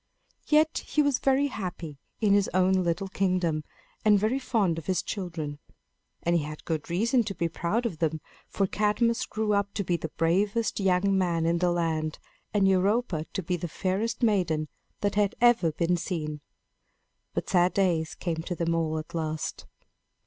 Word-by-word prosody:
Yet 310 Hz, +1 st, +3 dB
he 300 Hz, -, +2 dB
was 285 Hz, -3 st, +2 dB
very 270 Hz, +1 st, +3 dB
happy 180 Hz, -, -5 dB, 0.2 s
in 205 Hz, -2 st, +4 dB
his 200 Hz, -1 st, +3 dB
own 185 Hz, 0 st, +4 dB
little 180 Hz, 0 st, 0 dB
kingdom, 180 Hz, -5 st, 0 dB, 0.4 s
and 210 Hz, -1 st, +6 dB
very 220 Hz, +7 st, +1 dB
fond 200 Hz, -10 st, +1 dB
of 160 Hz, -, -13 dB
his 185 Hz, -2 st, +1 dB
children. 165 Hz, -7 st, -4 dB, 0.6 s
And 170 Hz, 0 st, +2 dB
he 170 Hz, -, +3 dB
had 150 Hz, +1 st, -7 dB
good 160 Hz, -2 st, -3 dB
reason 230 Hz, +8 st, +2 dB
to 200 Hz, -2 st, -4 dB
be 170 Hz, -, 0 dB
proud 185 Hz, +8 st, -1 dB
of 175 Hz, -9 st, -3 dB
them; 160 Hz, -1 st, 0 dB, 0.3 s
for 195 Hz, -, +1 dB
Cadmus 215 Hz, +4 st, +1 dB
grew 215 Hz, -1 st, -1 dB
up 200 Hz, 0 st, 0 dB
to 200 Hz, -, 0 dB
be 175 Hz, -2 st, 0 dB
the 160 Hz, -, -5 dB
bravest 200 Hz, +10 st, +1 dB
young 195 Hz, 0 st, +2 dB
man 170 Hz, -3 st, +1 dB
in 170 Hz, +1 st, +2 dB
the 180 Hz, 0 st, +2 dB
land, 160 Hz, -3 st, -1 dB, 0.3 s
and 200 Hz, -2 st, +3 dB
Europa 190 Hz, -3 st, +1 dB
to 195 Hz, -, -2 dB
be 180 Hz, +2 st, -1 dB
the 175 Hz, -, -4 dB
fairest 205 Hz, +8 st, -2 dB
maiden 175 Hz, -9 st, +1 dB, 0.3 s
that 205 Hz, -1 st, +1 dB
had 205 Hz, -1 st, +1 dB
ever 235 Hz, -9 st, +4 dB
been 170 Hz, +3 st, +1 dB
seen. 155 Hz, -4 st, -4 dB, 0.9 s
But -, -, -2 dB
sad 180 Hz, -1 st, +3 dB
days 170 Hz, -5 st, +1 dB
came 170 Hz, -3 st, -3 dB
to 175 Hz, +2 st, -4 dB
them 170 Hz, 0 st, 0 dB
all 160 Hz, -1 st, 0 dB
at 155 Hz, -, -7 dB
last. 155 Hz, -2 st, -3 dB
185 Hz, 180 wpm, -27 LUFS, 165-205 Hz, 0.9 s, and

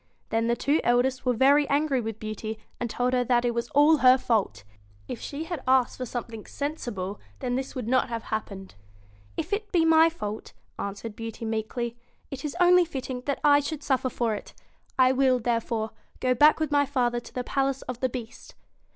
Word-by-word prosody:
Then 225 Hz, +1 st, 0 dB
the 235 Hz, -, +2 dB
two 290 Hz, +6 st, +1 dB
eldest 255 Hz, +2 st, +1 dB
were 250 Hz, -, +4 dB
very 280 Hz, +4 st, +4 dB
angry 280 Hz, -2 st, +1 dB
with 225 Hz, -1 st, -5 dB
Beauty, 215 Hz, 0 st, -5 dB, 0.2 s
and 240 Hz, -, -2 dB
told 250 Hz, +3 st, 0 dB
her 250 Hz, -1 st, +3 dB
that 245 Hz, 0 st, +2 dB
it 240 Hz, -, +1 dB
was 235 Hz, 0 st, -3 dB
all 295 Hz, +3 st, +5 dB
her 255 Hz, -2 st, +6 dB
fault 220 Hz, -, 0 dB, 0.4 s
If 235 Hz, -, -6 dB
she 290 Hz, +2 st, -5 dB
had 325 Hz, -3 st, -5 dB
asked 260 Hz, -1 st, +3 dB
for 255 Hz, -, -4 dB
something 230 Hz, -2 st, -6 dB
sensible 235 Hz, -10 st, -4 dB, 0.2 s
this 260 Hz, +1 st, -3 dB
would 250 Hz, -4 st, -4 dB
not 255 Hz, +1 st, +2 dB
have 230 Hz, -1 st, -4 dB
happened. 195 Hz, -3 st, -5 dB, 0.6 s
'If -, -, -3 dB
it 420 Hz, +1 st, -2 dB
be 335 Hz, -3 st, +3 dB
my 325 Hz, 0 st, +6 dB
fault,' 215 Hz, -10 st, -6 dB, 0.3 s
answered 205 Hz, +2 st, -5 dB
Beauty 225 Hz, 0 st, -6 dB
meekly, 225 Hz, +2 st, -3 dB, 0.3 s
'it 275 Hz, -1 st, -6 dB
is 300 Hz, +2 st, -4 dB
only 360 Hz, 0 st, +6 dB
fitting 265 Hz, -6 st, -5 dB
that 280 Hz, -, -1 dB
I 290 Hz, -1 st, +6 dB
should 290 Hz, +1 st, -4 dB
suffer 260 Hz, -1 st, +1 dB
for 235 Hz, -3 st, -1 dB
it. 205 Hz, -, -8 dB, 0.4 s
I 255 Hz, -1 st, +5 dB
will, 260 Hz, -1 st, +3 dB
there 235 Hz, -1 st, 0 dB
fore, 220 Hz, -1 st, -3 dB, 0.3 s
go 255 Hz, 0 st, +2 dB
back 295 Hz, +6 st, +5 dB
with 310 Hz, -2 st, -1 dB
my 285 Hz, -1 st, +3 dB
father 245 Hz, -3 st, 0 dB
to -, -, -14 dB
the 250 Hz, -, -2 dB
palace 270 Hz, +1 st, -1 dB
of 250 Hz, -1 st, -6 dB
the 260 Hz, -, 0 dB
Beast.' 235 Hz, -2 st, -8 dB
255 Hz, 200 wpm, -26 LUFS, 230-280 Hz, 0.6 s, her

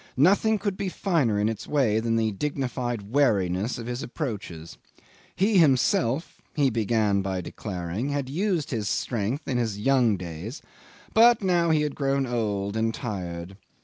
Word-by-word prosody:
Nothing 200 Hz, +9 st, +4 dB
could 200 Hz, -1 st, -3 dB
be 195 Hz, -, -2 dB
finer 155 Hz, -, +1 dB
in 105 Hz, -, +2 dB
its 110 Hz, -2 st, -4 dB
way 125 Hz, -8 st, +2 dB
than 115 Hz, 0 st, 0 dB
the 110 Hz, -1 st, +1 dB
dignified 125 Hz, -1 st, -3 dB
wariness 105 Hz, -6 st, +1 dB
of 115 Hz, -, -6 dB
his 120 Hz, +2 st, -4 dB
approaches. 105 Hz, -, -6 dB, 0.6 s
He 195 Hz, +1 st, +3 dB
himself 135 Hz, -1 st, +2 dB
he 140 Hz, -3 st, +3 dB
began 110 Hz, -2 st, +1 dB
by 95 Hz, -1 st, -2 dB
declaring 90 Hz, +6 st, -4 dB
had 140 Hz, -2 st, -2 dB
used 175 Hz, +2 st, -1 dB
his 110 Hz, -5 st, -2 dB
strength 120 Hz, +5 st, -2 dB
in 125 Hz, -3 st, 0 dB
his 110 Hz, -4 st, -1 dB
young 120 Hz, -2 st, +3 dB
days, 90 Hz, -, -7 dB, 0.5 s
but 230 Hz, -1 st, +6 dB
now 175 Hz, -3 st, +2 dB
he 155 Hz, -2 st, +3 dB
had 150 Hz, -2 st, -2 dB
grown 135 Hz, -1 st, 0 dB
old 105 Hz, -4 st, -2 dB
and 110 Hz, 0 st, +1 dB
tired. 95 Hz, -6 st, -5 dB
120 Hz, 155 wpm, -26 LUFS, 105-145 Hz, 0.6 s, but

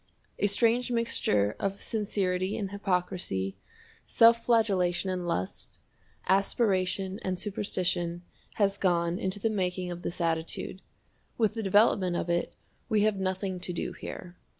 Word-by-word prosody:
A 205 Hz, -, +3 dB
strange 230 Hz, +5 st, +2 dB
mixture 105 Hz, -, +1 dB
of 195 Hz, 0 st, -2 dB
sincerity 195 Hz, -3 st, -1 dB
and 195 Hz, -3 st, -3 dB
hypocrisy, 180 Hz, -, -2 dB, 0.5 s
self 230 Hz, 0 st, +5 dB
flagellation 195 Hz, -6 st, +2 dB
and 180 Hz, -1 st, -3 dB
lust, 95 Hz, -, -4 dB, 0.5 s
aspiration 195 Hz, -1 st, +1 dB
and 185 Hz, -1 st, -2 dB
superstition, 180 Hz, -4 st, -1 dB, 0.3 s
has 200 Hz, -1 st, +1 dB
gone 170 Hz, -1 st, +1 dB
into 190 Hz, +2 st, -1 dB
the 225 Hz, -, +1 dB
making 180 Hz, -3 st, -1 dB
of 175 Hz, 0 st, -6 dB
this 175 Hz, -, -5 dB
attitude. 165 Hz, +2 st, -2 dB, 0.6 s
With 220 Hz, -3 st, +2 dB
the 225 Hz, -, -3 dB
development 195 Hz, -3 st, +3 dB
of 170 Hz, -, -1 dB
it 170 Hz, 0 st, -1 dB, 0.3 s
we 215 Hz, -2 st, +3 dB
have 215 Hz, -1 st, +2 dB
nothing 190 Hz, 0 st, -2 dB
to 180 Hz, -, -4 dB
do 170 Hz, -, -3 dB
here. 180 Hz, 0 st, -8 dB
190 Hz, 135 wpm, -29 LUFS, 175-205 Hz, 0.6 s, self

